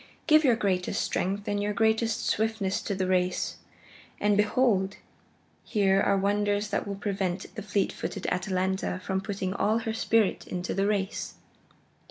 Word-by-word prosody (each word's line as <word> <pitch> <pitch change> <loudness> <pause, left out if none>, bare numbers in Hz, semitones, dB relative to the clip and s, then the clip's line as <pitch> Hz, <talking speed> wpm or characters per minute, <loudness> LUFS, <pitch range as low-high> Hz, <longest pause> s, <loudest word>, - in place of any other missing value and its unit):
Give 310 0 +6
your 250 -5 +5
greatest 185 -4 0
strength 200 +2 -1
and 205 0 0
your 210 0 -1
greatest 220 0 +1
swiftness 220 -3 0
to 200 - -3
the 190 0 -1
race, 185 0 0 0.6
and 205 0 +3
behold! 210 -2 +2 0.7
here 195 -2 +2
are 200 - +3
wonders 205 +1 +1
that 205 - -2
will 200 - -3
prevent 195 -2 -3
the 215 - -6
fleet 200 -1 0
footed - - -5
Atalanta 185 0 -1
from 190 -1 -1
putting 195 -2 -3
all 215 +2 +1
her 225 - -1
spirit 225 -2 +1
into 180 0 -3
the 195 +1 +1
race." 200 -1 -2
200 Hz, 155 wpm, -28 LUFS, 190-215 Hz, 0.7 s, Give